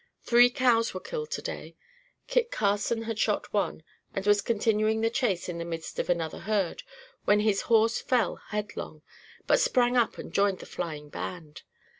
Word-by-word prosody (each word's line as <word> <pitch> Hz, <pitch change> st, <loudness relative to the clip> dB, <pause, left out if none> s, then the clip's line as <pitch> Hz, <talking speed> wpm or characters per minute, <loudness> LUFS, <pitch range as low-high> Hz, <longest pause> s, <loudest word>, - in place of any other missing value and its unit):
Three 245 Hz, +1 st, +6 dB
cows 240 Hz, -4 st, +2 dB
were -, -, -2 dB
killed 460 Hz, -, -5 dB
today. 475 Hz, -, -5 dB, 0.5 s
Kit 475 Hz, -1 st, +1 dB
Carson 225 Hz, -, 0 dB
had 225 Hz, -1 st, -4 dB
shot 210 Hz, -2 st, 0 dB
one, 200 Hz, -6 st, -1 dB, 0.3 s
and 195 Hz, -, -2 dB
was 205 Hz, 0 st, +4 dB
continuing 220 Hz, 0 st, +1 dB
the 225 Hz, 0 st, +1 dB
chase 235 Hz, -8 st, 0 dB
in 175 Hz, -2 st, -4 dB
the -, -, -2 dB
midst 165 Hz, -1 st, -6 dB
of -, -, -2 dB
another 165 Hz, -3 st, -1 dB
herd, 200 Hz, -4 st, -1 dB, 0.4 s
when 210 Hz, 0 st, +4 dB
his 210 Hz, -2 st, +2 dB
horse 225 Hz, 0 st, +4 dB
fell 245 Hz, -6 st, +1 dB
headlong, 210 Hz, -7 st, -5 dB, 0.4 s
but -, -, +4 dB
sprang 250 Hz, -, +3 dB
up 240 Hz, -2 st, +2 dB
and -, -, -8 dB
joined 200 Hz, -1 st, +2 dB
the -, -, -10 dB
flying 155 Hz, -4 st, -5 dB
band. 155 Hz, -2 st, -7 dB
210 Hz, 170 wpm, -28 LUFS, 185-235 Hz, 0.5 s, Three